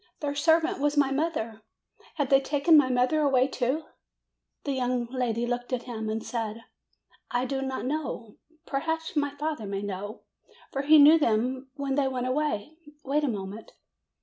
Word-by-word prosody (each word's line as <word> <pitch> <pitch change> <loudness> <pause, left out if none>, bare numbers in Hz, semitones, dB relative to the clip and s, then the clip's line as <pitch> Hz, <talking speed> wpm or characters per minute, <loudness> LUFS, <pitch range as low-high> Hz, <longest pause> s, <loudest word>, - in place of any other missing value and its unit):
Their 290 -1 -2
servant 320 0 +2
was 295 +1 0
my 280 -2 +4
mother! 270 -7 -2 0.5
Have 285 -4 -1
they 270 0 +6
taken 290 +4 +3
my 290 -4 +6
mother 255 +5 +2
away, 265 -3 +3
too?" 270 +4 -1 0.8
The 280 - -2
young 250 -2 0
lady 240 -3 -1
looked 245 +1 -3
at 245 -1 -1
him 220 -3 -5
and 220 +1 -3
said: 230 -1 -4 0.7
"I 245 +1 0
do 270 +1 -2
not 265 -1 -3
know. 265 -6 -4 0.3
Perhaps 320 +4 -2
my 290 -1 +1
father 290 -5 -4
may 195 0 -3
know, 205 +2 -6 0.5
for 275 - -1
he 305 +2 +6
knew 305 +3 +8
them 255 +1 0
when 280 -2 -2
they 275 0 +2
went 255 -1 -2
away. 295 0 -1 0.3
Wait 290 +3 0
a - - +2
moment." 205 -1 -5
265 Hz, 170 wpm, -27 LUFS, 240-290 Hz, 0.8 s, knew